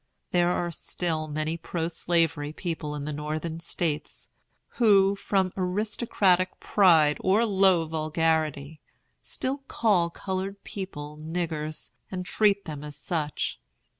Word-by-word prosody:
There 175 -1 +3
are 175 -1 0
still 160 -1 -3
many 155 +2 -2
pro 165 0 -3
slavery 165 -3 0
people 155 -3 -4
in 145 -1 -4
the 150 - -3
Northern 155 +2 -3
States, 165 -2 -3 0.5
who, 200 -4 +5
from 190 -2 0
aristocratic 185 -1 +1
pride 160 -7 +5
or 205 +5 +3
low 190 -5 +4
vulgarity, 155 -2 0 0.4
still 265 +2 -3
call 190 -7 +2
colored 190 +2 -4
people 150 -6 -7
"niggers," 155 -2 -3 0.2
and 180 -1 -4
treat 200 0 +2
them 150 -3 -6
as 150 -1 -7
such. 150 0 -2
170 Hz, 120 wpm, -27 LUFS, 155-190 Hz, 0.5 s, who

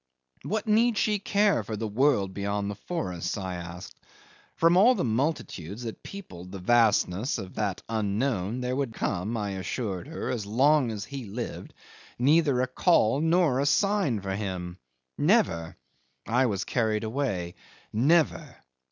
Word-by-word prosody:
What 215 +1 -2
need 225 +1 +3
she 210 0 +1
care 200 - +2
for 110 +1 -5
the 110 +1 -3
world 105 -4 +2
beyond 100 0 -2
the - - -6
forests? 90 - -4
I 95 -2 -4
asked. 85 0 -8 0.6
From 165 +1 +4
all 230 +8 +6
the 195 - -1
multitudes 115 - -2
that 115 -2 -6
peopled 90 - -10
the 100 - -6
vastness 110 +1 +2
of 95 -1 -7
that 100 -4 -2
unknown 110 +1 -1
there 125 0 -1
would 135 -5 -2
come, 105 +7 -2
I 105 -2 -2
assured 95 +2 -4
her, 160 - -4
as 110 -5 -3
long 135 +4 +3
as 105 -3 -4
he 135 -3 -7
lived, 110 +4 -6 0.4
neither 140 0 +3
a - - 0
call 130 -3 +3
nor 160 -5 +3
a 140 - +1
sign 195 - +2
for 95 0 -3
him. 95 -3 -5 0.4
Never. 85 +1 +2 0.5
I 125 +3 +3
was 100 -2 -1
carried 110 -3 0
away. 110 -8 -2 0.4
Never! 150 +9 +2
115 Hz, 150 wpm, -27 LUFS, 100-145 Hz, 0.6 s, all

